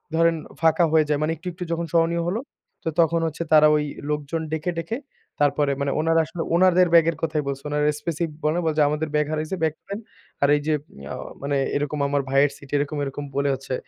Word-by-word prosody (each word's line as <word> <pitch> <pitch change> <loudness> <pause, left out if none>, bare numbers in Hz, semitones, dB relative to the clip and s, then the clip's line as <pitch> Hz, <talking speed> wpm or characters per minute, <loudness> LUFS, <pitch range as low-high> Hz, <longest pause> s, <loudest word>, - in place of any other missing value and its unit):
ধরেন 165 0 +4 0.3
ফাঁকা 165 +1 +4
হয়ে 155 -1 +5
যায়। 150 -1 +1
মানে 155 +1 +1
একটু, 180 - -10
একটু, 180 +1 -6
যখন 170 0 -1
সহনীয় 170 0 +2
হলো, 205 +6 0 0.4
তো 160 - -1
তখন 165 0 +2
হচ্ছে 160 +2 -4
তারা 155 0 +8
ওই 150 - +1 0.3
লোকজন 150 +2 -2
ডেকে, 160 +3 -1
ডেকে, 165 +8 -3 0.4
তারপরে 145 0 +2
মানে, 140 - 0
উনারা 165 +1 +3
আসলে 165 +1 -5
উনারদের 185 0 +5
ব্যাগের 165 -1 +5
কথাই 155 -2 0
বলছে। 140 0 -4
ওনারা 150 0 +1
এস্পেসি 160 +2 -3 0.2
বলেনাই, 165 +3 +1
বলে 160 -1 +1
যে, - - +6
আমাদের 155 +1 -2
ব্যাগ 150 0 +3
হারাইছে, 155 +3 -2
ব্যাগ 155 - +2 0.2
দেন। 200 +2 -4 0.4
আর - - +6
এই 145 - -1
যে, 155 - +3 0.4
আ - - -4 0.3
মানে 140 0 0 0.2
এরকম 145 +1 -1
আমার 145 0 +1
ভাইয়ের 140 +1 +4
সিট 140 - -15
এরকম, 145 +1 -2
এরকম, 140 +1 -4
বলে 140 0 +1
হচ্ছে 135 0 -5
155 Hz, 210 wpm, -24 LUFS, 145-165 Hz, 0.4 s, তারা